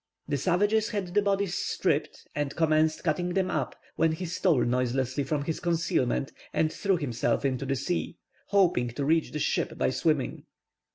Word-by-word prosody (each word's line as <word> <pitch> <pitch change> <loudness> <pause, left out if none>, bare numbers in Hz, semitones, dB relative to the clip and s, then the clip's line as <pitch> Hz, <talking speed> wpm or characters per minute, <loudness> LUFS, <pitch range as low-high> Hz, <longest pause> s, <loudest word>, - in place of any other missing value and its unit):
The 145 -1 0
savages 205 - +2
had 200 -5 -3
the 205 - +4
bodies 200 -2 0
stripped, 155 -5 -1
and 145 -1 -2
commenced 155 -1 +2
cutting 175 +2 0
them 190 -1 +1
up, - - -2 0.2
when 160 -1 +3
he 180 +3 -4
stole 170 -6 +2
noiselessly 125 +2 0
from 150 -3 -1
his 160 +2 -3
concealment, 160 -6 0 0.2
and 155 0 +1
threw 195 -2 +1
himself 120 -4 -1
into 135 0 -1
the 135 - +1
sea, 170 +5 -2 0.3
hoping 180 -11 +3
to 140 +2 -2
reach 160 +2 +2
the - - -3
ship 150 - -1
by - - +1
swimming. - - 0
160 Hz, 170 wpm, -28 LUFS, 140-180 Hz, 0.3 s, the